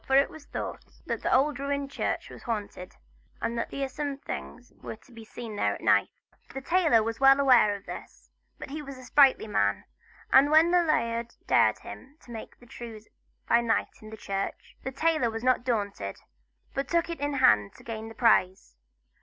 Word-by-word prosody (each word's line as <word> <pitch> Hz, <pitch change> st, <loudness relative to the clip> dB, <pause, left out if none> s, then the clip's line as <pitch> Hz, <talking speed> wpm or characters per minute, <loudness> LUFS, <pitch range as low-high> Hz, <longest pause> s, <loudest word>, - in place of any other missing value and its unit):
For 265 Hz, -, +2 dB
it 275 Hz, +1 st, +4 dB
was 315 Hz, -2 st, -12 dB
thought -, -, -6 dB, 0.2 s
that -, -, -3 dB
the -, -, -1 dB
old 280 Hz, +2 st, +3 dB
ruined 280 Hz, 0 st, -2 dB
church -, -, -3 dB
was -, -, -11 dB
haunted, 205 Hz, -6 st, -5 dB, 0.4 s
and 235 Hz, -, -2 dB
that 230 Hz, -, -2 dB
fearsome 275 Hz, +1 st, -4 dB
things 245 Hz, -2 st, -8 dB
were -, -, -6 dB
to 225 Hz, -, -23 dB
be 230 Hz, -1 st, -11 dB
seen 220 Hz, 0 st, -8 dB
there -, -, 0 dB
at -, -, -11 dB
night. -, -, +3 dB, 0.5 s
The 270 Hz, -, -4 dB
tailor 320 Hz, -7 st, +3 dB
was 225 Hz, +1 st, -4 dB
well 270 Hz, 0 st, +6 dB
aware 245 Hz, -7 st, +5 dB
of 200 Hz, -, -11 dB
this; -, -, -10 dB, 0.3 s
but -, -, -9 dB
he 305 Hz, +1 st, -5 dB
was 275 Hz, -2 st, -9 dB
a 255 Hz, -, -12 dB
sprightly 270 Hz, 0 st, +4 dB
man, 100 Hz, -, 0 dB, 0.5 s
and 275 Hz, +2 st, +7 dB
when 320 Hz, +3 st, +5 dB
the 355 Hz, 0 st, +5 dB
laird 235 Hz, -7 st, -1 dB
dared -, -, +4 dB
him 275 Hz, +3 st, -12 dB
to 240 Hz, -, -14 dB
make 225 Hz, -2 st, -9 dB
the 245 Hz, -, -17 dB
trews 230 Hz, -2 st, -10 dB, 0.4 s
by 235 Hz, -, +4 dB
night 230 Hz, -1 st, -1 dB
in 215 Hz, -, -11 dB
the 220 Hz, -, -9 dB
church, 195 Hz, -1 st, -5 dB
the 265 Hz, -, -5 dB
tailor 310 Hz, -2 st, +1 dB
was 225 Hz, +1 st, -5 dB
not 255 Hz, 0 st, +4 dB
to -, -, -19 dB
be -, -, -23 dB
daunted, 200 Hz, -, -2 dB, 0.6 s
but 275 Hz, 0 st, -2 dB
took 340 Hz, +2 st, +1 dB
it 335 Hz, -1 st, -5 dB
in 290 Hz, 0 st, -1 dB
hand 105 Hz, -, +4 dB
to -, -, -16 dB
gain 225 Hz, -1 st, -6 dB
the 225 Hz, -, -12 dB
prize. 185 Hz, -, +2 dB
250 Hz, 205 wpm, -28 LUFS, 220-280 Hz, 0.6 s, and